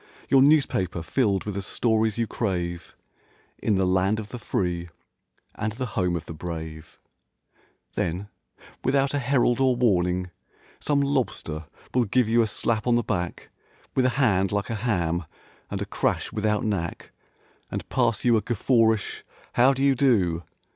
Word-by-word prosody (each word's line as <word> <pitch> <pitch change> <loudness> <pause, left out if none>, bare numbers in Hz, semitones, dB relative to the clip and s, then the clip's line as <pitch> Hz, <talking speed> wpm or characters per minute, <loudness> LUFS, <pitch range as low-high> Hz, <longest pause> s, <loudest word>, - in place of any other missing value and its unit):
Your 135 - +6
newspaper 135 - +3
filled 100 0 +1
with 105 - -3
the 100 - -3
stories 110 +1 +1
you 115 - +1
crave 90 -6 -3 0.7
In 105 - +2
the 95 0 +2
"Land 95 +3 +2
of 105 -1 -7
the 125 - -7
free 90 -5 -2 0.6
and 110 0 -3
the 130 +3 -3
home 90 -4 +1
of 85 - -4
the - - -7
brave"— 80 -1 -7 1.0
Then, 90 +5 -2 0.6
without 135 +1 +2
a 145 - +1
herald 125 -2 +2
or 130 -2 +3
warning. 90 -6 +1 0.5
Some 145 -1 +1
lobster 115 - -1 0.3
will 125 -2 +3
give 120 +3 +2
you 115 +1 +4
a 115 - +2
slap 110 +2 -1
on 120 - +4
the 120 - +2
back 90 -6 -3 0.4
With 130 - +3
a - - +5
hand 100 -8 +3
like 100 +2 -1
a 110 -3 -3
ham 85 -7 0 0.4
and - - -3
a - - -5
crash - - -1
without 105 -1 0
knack 95 -6 -3 0.6
And - - -5
pass 115 - +1
you 120 -1 +5
a - - +1
guffawish 115 -2 +1 0.3
"How 125 +3 +5
do 135 0 -1
you 140 -1 +5
do?" 105 -11 +2
110 Hz, 160 wpm, -25 LUFS, 90-125 Hz, 1.0 s, Your